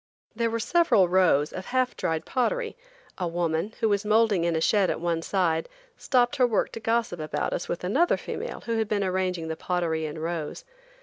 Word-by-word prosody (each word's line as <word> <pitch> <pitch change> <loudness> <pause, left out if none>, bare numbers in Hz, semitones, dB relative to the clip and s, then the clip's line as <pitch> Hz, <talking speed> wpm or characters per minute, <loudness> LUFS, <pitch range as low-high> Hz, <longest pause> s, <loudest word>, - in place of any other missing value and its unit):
There 230 +1 +1
were 230 0 -2
several 280 - +3
rows 175 -5 +3
of 190 - -6
half 255 0 0
dried 160 -2 -2
pottery. 450 - -1 0.4
A 180 - -1
woman, 170 +4 -1
who 225 - +3
was 205 0 +1
moulding 210 -4 +3
in 170 -1 +1
a - - +1
shed 195 +3 +3
at - - -1
one 170 -1 -1
side, 165 -3 0 0.3
stopped 245 -2 +1
her 250 -2 +4
work 220 -4 0
to - - -6
gossip 225 -5 0
about 155 0 -2
us - - -4
with 175 - -3
another 280 - +2
female - - -6
who 230 -1 -1
had 220 - 0
been 205 -1 0
arranging 185 -3 -1
the 160 - -3
pottery 165 -3 -1
in 150 - -7
rows. 165 - -4
190 Hz, 200 wpm, -26 LUFS, 165-230 Hz, 0.4 s, her